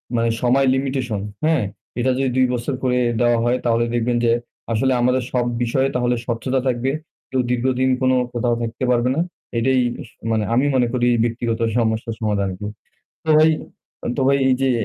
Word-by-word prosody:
মানে 115 0 +2
সময় 130 +2 +3
লিমিটেশন, 130 -6 -2 0.2
হ্যাঁ? 160 -6 +3 0.4
এটা 130 +2 +2
যদি 135 -1 +1
২ 130 - +5
বছর 120 +3 -2
করে 125 -1 +2 0.2
দেওয়া 120 -1 +4
হয় 120 +1 +2
তাহলে 115 0 +2
দেখবেন 120 +1 +1
যে 115 - +4 0.4
আসলে 130 +4 +2
আমাদের 125 +1 +2
সব 125 -1 +1 0.2
বিষয়ে 130 +3 +1
তাহলে 125 0 +1
স্বচ্ছতা 130 +3 -1
থাকবে। 125 +1 0 0.4
কেউ 130 - +1
দীর্ঘদিন 130 +1 +1
কোন 130 0 +3 0.2
কোথাও 120 0 +1
থাকতে 115 +2 -4
পারবে 125 +1 +2
না। - - 0 0.4
এটাই 130 +2 +2 0.3
স - - -19 0.2
মানে 110 -1 +1
আমি 130 +4 +3
মনে 125 -2 +3
করি 120 -1 +1 0.2
ব্যক্তিগত 115 0 -1 0.2
সমস্যার 115 0 0
সমাধান 105 -3 0
আরকি। 95 +2 -6 0.6
তো - - -10
ভাই 155 +1 +6 0.5
আ - - -3
তো - - -1
ভাই 140 0 +4
এই 130 - +4
যে 135 - +3
125 Hz, 180 wpm, -21 LUFS, 115-130 Hz, 0.6 s, ভাই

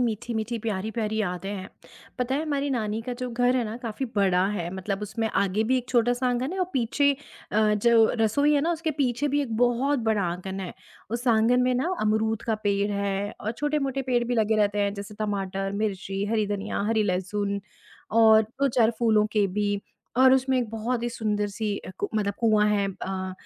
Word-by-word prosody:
मीठी-मीठी, 230 0 -2
प्यारी-प्यारी 220 +1 -2
यादें 180 -1 -3
हैं। 195 -1 -5 0.5
पता 250 +2 0
है, 300 - 0
हमारी 285 -2 -1
नानी 220 -3 -1
का 250 - -4
जो 250 - -2
घर 245 +2 +2
है 245 - +1
ना, 220 +2 -5
काफ़ी 230 +3 -3
बड़ा 190 -2 +3
है, 175 -3 -3
मतलब 195 +2 -3
उसमें 220 +2 -2
आगे 200 +1 +1
भी 260 +3 +2
एक 250 - -8
छोटा-सा 245 +1 +2
आँगन 250 +6 -1
है 380 - -4
और 370 - +2
पीछे 275 +2 +2 0.4
अ, 215 0 +3
जो 225 +1 +4
रसोई 285 +7 +3
है 285 - +3
ना, 330 +4 +1
उसके 325 -1 -2
पीछे 260 +2 +1
भी - - +3
एक 230 -5 -4
बहुत 245 +4 +2
बड़ा 210 -2 +1
आँगन 190 +2 -5
है। 185 -2 -5 0.4
उस 240 +2 -3
आँगन 230 +2 +4
में 250 0 +2
ना 330 +9 0
अमरूद 220 +1 +1
का 225 - 0
पेड़ 200 0 +1
है 200 0 -2
और 220 - -2
छोटे-मोटे 275 -1 -1
पेड़ 245 -2 +1
भी 245 +1 -1
लगे 220 -1 +2
रहते 205 -1 +2
हैं, 200 0 +1
जैसे 200 +1 -8
टमाटर, 195 -2 -2
मिर्ची, 200 -1 -2
हरी 215 -2 +1
धनिया, 200 -1 -3
हरी 220 -1 +2
लहसुन 200 +1 -1 0.5
और 220 0 +6
2-4 240 0 +1
फूलों 215 -3 +3
के 210 -2 +3
भी, 205 +1 -1 0.4
और 260 +1 +7
उसमें 265 0 +2
एक 240 -3 -1
बहुत 230 +2 -2
ही 240 - 0
सुंदर-सी 210 -2 -2
अ, - - -9
कु - - -1
मतलब 200 -2 0
कुआँ 215 -2 +4
है 200 -1 +2 0.2
अ, 190 0 -3
220 Hz, 200 wpm, -26 LUFS, 205-245 Hz, 0.5 s, और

